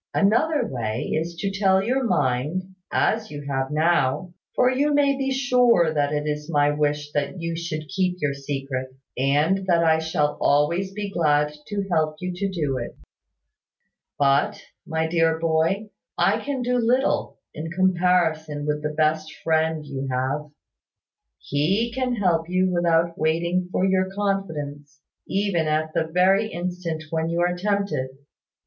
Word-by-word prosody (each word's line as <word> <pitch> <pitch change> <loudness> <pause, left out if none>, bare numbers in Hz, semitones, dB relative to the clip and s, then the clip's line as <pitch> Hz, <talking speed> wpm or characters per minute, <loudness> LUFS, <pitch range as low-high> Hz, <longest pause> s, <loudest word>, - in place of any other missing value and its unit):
Another 245 +7 +3
way 115 -3 -3
is 165 +2 -2
to 195 +3 -2
tell 195 -1 +3
me 195 - -2
your 260 +3 +1
mind, 150 - 0 0.2
as 220 0 +1
you 145 -1 -7
have 135 -1 -1
now; 165 +2 +1 0.2
for 250 0 +4
you 285 +3 +1
may 280 -1 +3
be 270 0 -1
sure 250 - +3
that 145 -1 +1
it 150 0 -1
is 150 +1 -3
my 145 -2 +3
wish 150 0 -1
that 145 +4 -2
you 165 0 -3
should 160 -2 -4
keep 180 +4 -1
your 145 -3 0
secret, 135 -2 -4 0.3
and 150 +9 +1
that 170 -2 +3
I 160 -1 +4
shall 150 -2 -1
always 170 +7 +2
be 205 0 -5
glad 150 -4 +2
to 200 -1 -3
help 155 -2 +1
you 180 0 -4
to 195 +2 -2
do 150 -8 -1
it. 120 - -7 1.2
"But, 140 0 +2 0.3
my 160 0 0
dear 165 0 +2
boy, 165 +6 0 0.3
I 195 +6 +2
can 275 -3 -2
do 250 +1 +1
but 240 - +1
little, 255 +4 +1 0.2
in 155 +2 -5
comparison 170 -4 +1
with 150 0 -1
the 150 0 -3
best 155 0 +1
Friend 160 -1 +1
you 135 -1 -5
have. 130 +4 -2 0.9
He 190 +12 0
can 255 -1 -1
help 175 -6 +1
you 185 +1 +2
without 170 -1 +1
waiting 170 +3 0
for 185 - +1
your 190 0 +2
confidence, 155 -8 -3 0.3
even 190 -5 0
at 155 +1 0
the 160 - +1
very 190 +5 +3
instant 175 -2 -4
when 160 0 -1
you 170 +1 0
are 175 0 +1
tempted. 200 -7 -1
165 Hz, 160 wpm, -24 LUFS, 150-195 Hz, 1.2 s, for